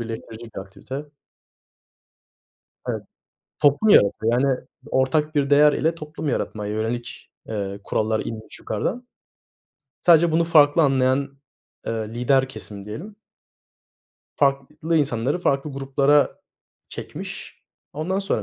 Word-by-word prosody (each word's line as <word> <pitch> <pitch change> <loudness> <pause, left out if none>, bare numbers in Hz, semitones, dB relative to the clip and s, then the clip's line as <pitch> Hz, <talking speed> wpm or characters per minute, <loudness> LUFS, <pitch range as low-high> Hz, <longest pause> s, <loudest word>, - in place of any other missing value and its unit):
birleştirecek 115 0 -7
bir - - -4
aktivite. 130 +10 -8 1.8
Evet. - - -3 0.6
Toplum 145 +8 +4
yaratıyor, 110 - +5
yani, 135 -2 +2 0.3
ortak 150 +4 +1
bir 140 -1 +2
değer 145 +1 +6
ile 160 +2 +1
toplum 150 0 -6
yaratmaya 105 -4 -2
yönelik, 115 +2 -4 0.2
eee, 100 -2 -4
kurallar 110 0 0
inmiş 110 -1 -7
yukarıdan. 240 - -3 1.0
Sadece 170 -1 +5
bunu 165 +1 +3
farklı 155 -1 +5
anlayan, 135 0 +2 0.6
ııı, 110 -1 -2
lider 130 +3 +2
kesim 100 -6 -8
diyelim. 185 - -8 1.2
Farklı 145 +4 0
insanları 135 0 +1
farklı 140 -4 0
gruplara 140 +1 +2 0.5
çekmiş. - - -7 0.3
Ondan 175 +6 -2
sonra 195 - -1
135 Hz, 105 wpm, -23 LUFS, 115-150 Hz, 1.8 s, değer